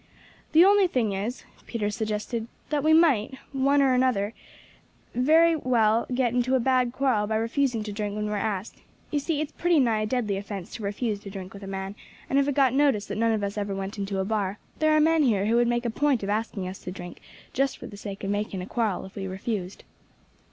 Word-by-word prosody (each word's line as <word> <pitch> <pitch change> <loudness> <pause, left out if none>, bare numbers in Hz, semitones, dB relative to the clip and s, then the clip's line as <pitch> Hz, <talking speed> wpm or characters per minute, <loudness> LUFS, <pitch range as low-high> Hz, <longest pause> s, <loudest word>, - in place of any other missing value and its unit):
"The 330 +3 +8
only 400 -1 +5
thing 235 - 0
is," 210 +6 -4 0.2
Peter 210 -3 -2
suggested, 220 +1 -3 0.2
"that 295 -2 +1
we 310 - +4
might, 285 -8 +4 0.2
one 275 +1 +3
or 265 -1 +4
other, 215 -4 0 0.8
very 320 +6 +4
well 230 -5 +2
get 250 -2 +1
into 250 +1 +2
a - - +3
bad 255 0 +2
quarrel 245 -6 +1
by 220 - -1
refusing 230 +1 0
to 210 - -5
drink 205 0 -3
when 210 0 -2
we 210 - -3
are - - -1
asked. 205 0 -3 0.3
You 295 - +1
see 300 +1 -1
it's 305 0 -3
pretty 345 -2 +2
nigh 230 -5 +2
a - - 0
deadly 215 -4 -1
offence 195 -2 -6
to 225 - -7
refuse 205 +1 -2
to 200 - -9
drink 190 -1 -8
with 200 - -10
a 195 - -8
man; 195 0 -4 0.4
and 275 - +4
if 280 - +2
it 285 - 0
got 265 -3 +4
noticed 270 -7 +2
that - - -3
none 230 0 +3
of 215 -2 0
us 200 +1 -2
ever 200 -1 -2
went 195 +2 -5
into 195 0 -2
a 190 - 0
bar, 205 -2 -1 0.2
there 310 0 +3
are 310 - +5
men 320 +1 +4
here 215 -8 +2
who 225 +2 +2
would 240 0 +3
make 240 0 0
a 235 - 0
point 280 -3 +1
of 195 - -3
asking 210 -3 -2
us 185 +1 -7
to 180 - -7
drink 175 -2 -9 0.3
just 270 +1 0
for - - -10
the 205 - -9
sake 200 0 -7
of 195 - -1
making 205 -2 -2
a - - -5
quarrel 215 -4 -1
if 190 - -13
we 195 -1 -4
refused." 190 0 -4
225 Hz, 235 wpm, -26 LUFS, 200-265 Hz, 0.8 s, The